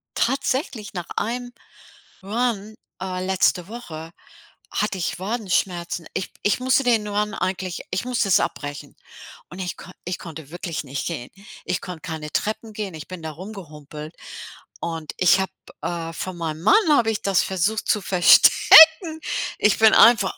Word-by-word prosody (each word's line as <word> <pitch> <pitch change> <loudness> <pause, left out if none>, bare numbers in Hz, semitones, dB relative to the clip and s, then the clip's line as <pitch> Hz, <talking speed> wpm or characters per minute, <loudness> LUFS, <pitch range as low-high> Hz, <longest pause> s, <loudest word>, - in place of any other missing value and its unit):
tatsächlich 265 - -1
nach 175 -3 -5
einem 245 +2 -3 0.7
Run, 220 0 -2 0.3
äh, 185 -1 -3
letzte 185 -1 +1
Woche 165 -9 -8 0.6
hatte 210 -2 -1
ich 170 - -2
Wadenschmerzen. 185 -5 -2
Ich - - -4
ich 205 +4 +2
musste 260 +2 +2
den 230 -4 +2
Run 210 +1 -1
eigentlich 185 -3 -3
ich 185 +6 -2
musste 245 -4 0
es - - +5
abbrechen. 145 -1 -5 0.5
Und 175 - -11
ich 180 -2 -4
konn 185 - -12
ich 180 0 -4
konnte 160 -3 -10
wirklich 170 -2 -5
nicht 140 0 -4
gehen. 150 -8 -5 0.4
Ich 180 - -2
konnte 180 -3 -8
keine 155 -2 -6
Treppen 220 +1 -2
gehen, 205 -4 -5
ich 155 - -9
bin 185 -3 -9
da 160 - -4
rumgehumpelt 155 -4 -10 0.7
und 165 -2 -4
ich 180 +1 +4
habe, 190 - -2 0.3
äh, 165 -1 -4
von 185 +1 -6
meinem 160 -1 -4
Mann 210 - +6 0.2
habe 235 -6 +4
ich 215 - -3
das 195 -2 +3
versucht 195 +4 -1
zu 210 - +2
verstecken. 320 - +7 0.4
Ich 210 0 +3
bin 220 -1 +6
einfach 230 -5 +5
185 Hz, 155 wpm, -22 LUFS, 170-220 Hz, 0.7 s, verstecken